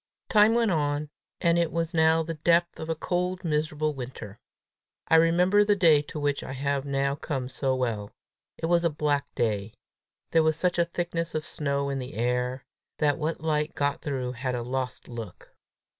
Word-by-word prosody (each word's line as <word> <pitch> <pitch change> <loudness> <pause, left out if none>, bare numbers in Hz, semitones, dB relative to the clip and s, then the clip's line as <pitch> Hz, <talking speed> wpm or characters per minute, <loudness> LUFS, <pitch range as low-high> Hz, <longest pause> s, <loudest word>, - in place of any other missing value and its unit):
Time 215 +1 +5
went 230 -3 +3
on, 145 -2 -1 0.3
and 170 0 +3
it 170 -2 +1
was 165 -1 -2
now 160 0 +4
the 165 +1 -4
depth 170 +2 +2
of 160 - -6
a 165 - 0
cold, 180 +3 -2
miserable 155 -1 0
winter. 125 -6 -8 0.7
I - - +4
remember 180 +5 +4
the 205 0 +3
day 165 -6 +5
to 150 +1 -7
which 145 -1 0
I - - -6
have 140 +1 -1
now 140 0 0
come 140 -3 -3
so 130 +1 -1
well! 115 -5 -2 0.5
It - - -3
was 170 +1 +3
a 170 - +3
black 145 -2 -1
day. 105 -2 -1 0.6
There 165 - +5
was 160 0 +2
such 180 0 +1
a 170 - +4
thickness 170 -1 -3
of 155 0 -2
snow 140 -1 -1
in 135 - -2
the 130 +2 -7
air, 125 +2 -1 0.3
that 150 +1 +1
what 155 +1 -2
light 155 -1 0
got 145 0 0
through 130 -5 -2
had 125 0 -3
a 120 - -3
lost 130 +1 -4
look. 115 -6 -9
150 Hz, 190 wpm, -27 LUFS, 130-165 Hz, 0.7 s, Time